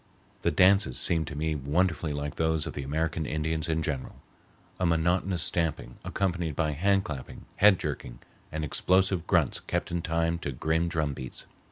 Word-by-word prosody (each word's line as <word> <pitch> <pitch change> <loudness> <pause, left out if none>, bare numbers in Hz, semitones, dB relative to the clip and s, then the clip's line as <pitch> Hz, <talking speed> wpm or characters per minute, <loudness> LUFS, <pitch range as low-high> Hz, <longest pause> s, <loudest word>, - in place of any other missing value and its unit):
The - - +2
dances 95 -8 +4
seemed 80 -2 +1
to 75 - -6
me 80 +2 0
wonderfully 75 +3 0
like 75 0 -3
those 80 -1 0
of - - -5
the 70 - -4
American 80 +2 -1
Indians 80 +1 -2
in 80 0 0
general, 70 -5 -3 0.6
a 90 - +1
monotonous 85 +2 +1
stamping 80 -7 -2
accompanied 90 -6 -1
by 80 0 +1
hand 95 +6 +2
clapping, 70 -4 -7
head 105 -1 +7
jerking, - - -5 0.3
and 80 0 -2
explosive 95 +3 +2
grunts 85 -8 +2
kept - - -3
in 85 0 -1
time 85 +1 0
to 75 - -3
grim 80 +6 0
drum 80 -4 -1
beats. 65 -1 -5
80 Hz, 170 wpm, -28 LUFS, 75-85 Hz, 0.6 s, head